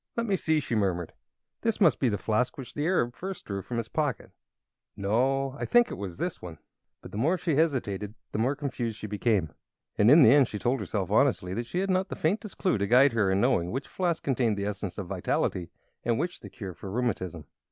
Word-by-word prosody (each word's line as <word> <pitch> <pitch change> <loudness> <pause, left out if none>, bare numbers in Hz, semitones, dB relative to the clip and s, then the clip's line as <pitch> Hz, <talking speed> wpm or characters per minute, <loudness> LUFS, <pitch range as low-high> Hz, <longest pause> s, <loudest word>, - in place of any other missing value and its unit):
"Let 235 - +1
me 200 -4 +1
see," 160 -3 +1
she 135 - -4
murmured; 95 -6 0 0.5
"this 225 -1 0
must 175 -7 +4
be 130 - +2
the 105 - -1
flask 110 +5 0
which 130 -3 -8
the 150 +2 -1
Arab 125 -10 +1
first 190 +1 -6
drew 100 -1 -4
from 120 +5 -5
his 115 -1 -2
pocket. 145 0 -2 0.7
No 130 +7 +1
I - - -2
think 240 -1 +4
this - - -5
was 95 -4 -6
the - - 0
one." - - -9 0.5
But - - -10
the 105 - -4
more 165 +10 +2
she 170 -2 -1
hesitated 115 - 0 0.2
the - - -2
more 130 +6 +1
confused 125 -6 -3
she 110 - -7
became, 105 - 0 0.5
and 105 - +6
in 150 +3 +8
the 115 - +8
end 140 -2 +6
she 105 - -5
told 125 +5 0
herself 95 -5 -3
honestly 90 0 +2
that 115 +4 -3
she 180 +9 -1
had 195 0 0
not 185 +1 +1
the - - -4
faintest 200 +6 -1
clue 185 - +1
to 100 - 0
guide 130 +3 +6
her 105 -4 +2
in 95 - +2
knowing 110 -9 +2
which 130 +8 -4
flask 175 -3 -1
contained 120 -6 +1
the 100 - -2
Essence 100 -2 -4
of 100 - -4
Vitality 85 0 -1 0.3
and 115 -1 +1
which 175 +4 -2
the - - -10
cure 100 -7 -7
for 95 - -9
rheumatism. 95 -8 -2
120 Hz, 230 wpm, -28 LUFS, 100-150 Hz, 0.7 s, in